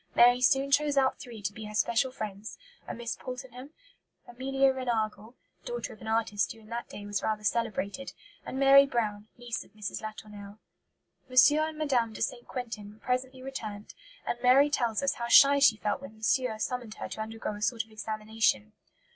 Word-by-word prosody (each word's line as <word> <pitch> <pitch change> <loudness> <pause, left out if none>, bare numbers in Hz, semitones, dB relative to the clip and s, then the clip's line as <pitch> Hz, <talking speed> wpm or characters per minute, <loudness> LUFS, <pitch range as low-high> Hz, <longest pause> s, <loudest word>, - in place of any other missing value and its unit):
Mary 245 +1 +6
soon 270 +2 +3
chose 290 0 +3
out 265 -1 +2
three 230 -5 -10
to 195 +1 -2
be 220 - -8
her 210 0 -8
special 235 +4 +2
friends; 215 -3 -7 0.3
a - - -5
Miss 235 0 -4
Poultenham, 255 +1 -8 0.6
Amelia 270 +2 +1
Reinagle 230 -3 -2 0.3
(daughter 485 0 -5
of 215 - -17
an - - -8
artist 220 -2 0
who 225 - -11
in 215 -1 -17
that 235 +1 -5
day 205 - -9
was 205 0 -2
rather 215 -1 -2
celebrated), 220 +2 -2 0.3
and - - -6
Mary 275 +1 +7
Brown 215 -5 -2
niece 240 -1 -4
of - - -23
Mrs. 210 -2 -5
Latournelle. 210 -1 -9 0.7
M. 275 +4 +6
and 310 0 -2
Mme. 230 -3 +2
de - - -7
St. 240 -1 -4
Quentin 215 -4 -7
presently 255 +1 -2
returned, 215 -6 -7 0.3
and 240 - -3
Mary 270 +4 +5
tells 235 -3 0
us 275 - +2
how 235 - -1
shy 280 +3 +7
she 265 -6 +5
felt 210 -1 -2
when 195 +4 -10
"Monsieur" 220 +1 0
summoned 240 -1 -4
her - - -6
to - - -6
undergo 220 0 -5
a 205 - -9
sort 225 0 0
of 225 - -24
examination. 215 - -1
235 Hz, 185 wpm, -29 LUFS, 215-260 Hz, 0.7 s, Mary